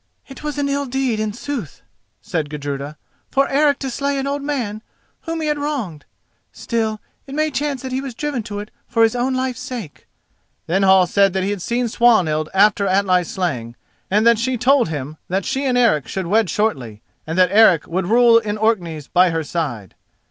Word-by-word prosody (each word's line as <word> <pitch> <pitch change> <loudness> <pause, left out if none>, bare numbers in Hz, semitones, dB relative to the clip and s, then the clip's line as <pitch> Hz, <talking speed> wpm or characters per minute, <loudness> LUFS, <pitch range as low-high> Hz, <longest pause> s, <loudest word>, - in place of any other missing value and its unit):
"It 270 - -11
was 300 -1 -4
an 285 -1 0
ill 280 0 -1
deed 255 -3 -1
in 215 -1 -1
sooth," 245 - -6 0.4
said 165 -8 -2
Gudruda, 145 0 -5 0.3
"for 275 0 +2
Eric 285 0 +2
to 270 -2 -3
slay 280 +3 -1
an 270 - -2
old 280 +1 -2
man 245 -8 -3 0.4
whom 330 -1 -3
he 310 - -1
had 300 -1 0
wronged. 250 - -4 0.5
Still, 220 -2 -2 0.3
it 275 - -7
may 310 0 +1
chance 285 -2 -2
that 260 - -5
he 260 +1 -1
was 270 -4 -7
driven 290 -3 -2
to 205 -1 -7
it 205 +1 -7 0.2
for 230 - +2
his 225 +1 +3
own 255 +2 0
life's 255 -1 -2
sake." 225 - -8 0.6
Then 190 +4 0
Hall 190 -1 +5
said 195 +1 +2
that 190 -1 0
he 195 - -1
had 205 -3 -4
seen 240 +5 -1
Swanhild 180 -11 +2
after 200 +1 +3
Atli's 185 -2 +2
slaying, 145 - -3 0.3
and 210 +3 +2
that 235 -2 +5
she 255 +3 0
had 245 - -4
told 265 0 +4
him 150 0 -5
that 190 +1 -1
she 270 +1 -2
and 250 -1 +1
Eric 220 - +3
should 190 -2 -3
wed 210 +2 +2
shortly, 130 - -2 0.2
and 160 +2 -3
that 185 -1 +4
Eric 200 -7 +5
would 175 +1 -2
rule 230 +1 +6
in 210 -2 -4
Orkneys 175 -9 -1
by 180 0 +4
her 165 -1 -1
side. 140 - -4
215 Hz, 205 wpm, -20 LUFS, 175-260 Hz, 0.6 s, rule